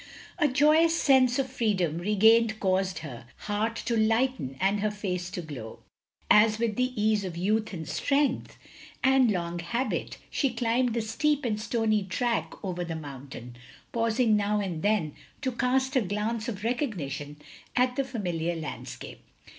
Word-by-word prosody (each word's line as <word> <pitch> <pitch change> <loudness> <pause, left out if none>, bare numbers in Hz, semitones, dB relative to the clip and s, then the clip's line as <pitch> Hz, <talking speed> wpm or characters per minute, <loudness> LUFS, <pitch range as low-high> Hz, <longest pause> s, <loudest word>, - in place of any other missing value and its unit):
A 300 - +4
joyous 305 +4 +4
sense 260 -3 +4
of 270 -1 0
freedom 200 - 0
regained 215 +3 +4
caused 190 -2 +1
her 120 -4 -9 0.2
heart 215 +2 -1
to 235 - 0
lighten 220 - +1
and 195 +4 +2
her 215 +1 +1
face 185 -4 -3
to 180 - -5
glow; 125 -8 -8 0.5
as 215 +1 +5
with 225 -2 -1
the 250 -1 -1
ease 210 -1 +2
of 180 -3 -5
youth 215 +5 0
and 160 -5 -6
strength, 285 0 0 0.5
and 265 -2 +5
long 175 -3 -2
habit, 235 +8 -2
she 275 - +1
climbed 235 +1 +1
the 230 - 0
steep 290 +5 0
and 215 -2 -1
stony 220 -2 +1
track 230 +6 -1
over 180 -2 -3
the 165 -1 -4
mountain, 135 -5 -9 0.4
pausing 230 -1 +2
now 210 0 +1
and 180 -6 -3
then 200 -8 +1 0.3
to 260 - 0
cast 260 +2 0
a 260 - +4
glance 215 +3 -2
of 205 -3 -6
recognition 165 - -3 0.4
at 250 0 +2
the 275 - +1
familiar 175 -10 -2
landscape. 160 -2 -7
215 Hz, 155 wpm, -28 LUFS, 180-245 Hz, 0.5 s, as